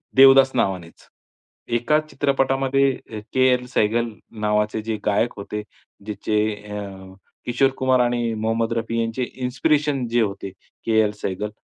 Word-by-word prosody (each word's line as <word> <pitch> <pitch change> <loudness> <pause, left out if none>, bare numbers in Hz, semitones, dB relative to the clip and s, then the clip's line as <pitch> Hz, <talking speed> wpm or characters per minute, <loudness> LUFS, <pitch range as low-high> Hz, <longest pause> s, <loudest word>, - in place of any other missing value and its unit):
देवदास 135 0 +8
नावानेच, 95 -7 -2 0.7
एका 150 +6 +2
चित्रपटामध्ये 135 0 +1 0.2
अ, 110 - -5
के. 130 0 +4
एल. 125 0 -1
सेहगल 115 -1 +1 0.3
नावाचे 105 +1 +1
जे 110 0 -3
गायक 105 +3 +1
होते, 105 +1 -5 0.4
ज्याचे 105 0 -1 0.2
अ, 100 -2 -8 0.3
किशोर 130 +3 +2
कुमार 130 -1 +2
आणि 120 -1 +1
मोहम्मद 115 +1 -1
रफी 115 0 -1
यांचे 115 +3 -2 0.2
इन्स्पिरेशन 145 +1 +1
जे 120 0 +2
होते 100 -2 -3 0.3
के. 110 -1 +3
एल. 105 -1 +1
सेहगल 105 +3 -3
115 Hz, 135 wpm, -22 LUFS, 105-130 Hz, 0.7 s, देवदास